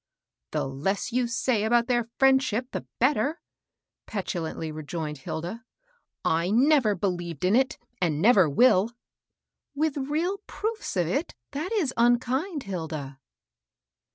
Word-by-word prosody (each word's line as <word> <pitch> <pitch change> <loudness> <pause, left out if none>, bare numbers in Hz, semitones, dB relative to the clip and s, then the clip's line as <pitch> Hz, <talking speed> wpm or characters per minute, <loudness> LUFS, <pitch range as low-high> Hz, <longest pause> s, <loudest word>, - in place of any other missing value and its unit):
" - - -62
The - - 0
less 150 - -2
you 250 -1 +2
say 235 -2 0
about 235 +1 +3
their 240 -2 0
friendship, 265 -2 +3
the - - -5
better," 280 +4 +2 0.7
petulantly 165 -5 -3
rejoined 155 -1 -5
Hilda. 175 - -5 0.6
I 165 +2 +2
never 245 -1 +4
be 185 - -2
lieved 175 -4 -3
in 190 +4 +4
it, 265 +1 +2 0.2
and 160 -5 +1
never 195 -4 +5
will." 205 - +4 0.4
" - - -59
With 305 0 0
real 315 +8 -1
proofe 440 - -4
of 175 - +2
it, 275 - -2 0.2
that 310 +8 -4
is 355 - 0
unkind, 255 +7 +2
Hilda." 155 -7 -5
230 Hz, 135 wpm, -27 LUFS, 170-270 Hz, 0.7 s, never